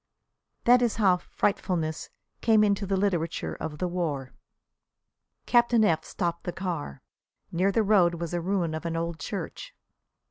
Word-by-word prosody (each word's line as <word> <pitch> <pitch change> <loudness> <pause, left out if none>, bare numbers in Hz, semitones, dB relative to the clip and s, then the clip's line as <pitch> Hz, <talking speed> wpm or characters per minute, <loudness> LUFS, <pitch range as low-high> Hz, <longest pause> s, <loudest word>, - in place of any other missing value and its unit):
That 245 +1 +6
is 240 -3 +1
how 195 -5 +4
"frightfulness" 170 -4 -2 0.3
came 220 -2 +5
into 200 -1 +1
the 195 0 +1
literature 180 -4 -1
of 150 -1 -5
the 180 - -1
war. 155 -7 -3 1.1
Captain 240 -2 +4
F 160 -5 +2
stopped 170 -1 -3
the 175 - -3
car. 170 - -5 0.5
Near 185 +4 +2
the 220 +3 +2
road 190 -5 +4
was 170 0 -5
a 175 - -1
ruin 175 -2 0
of 160 +1 -4
an 165 - -3
old 165 0 -3
church. - - -6
180 Hz, 150 wpm, -27 LUFS, 165-205 Hz, 1.1 s, That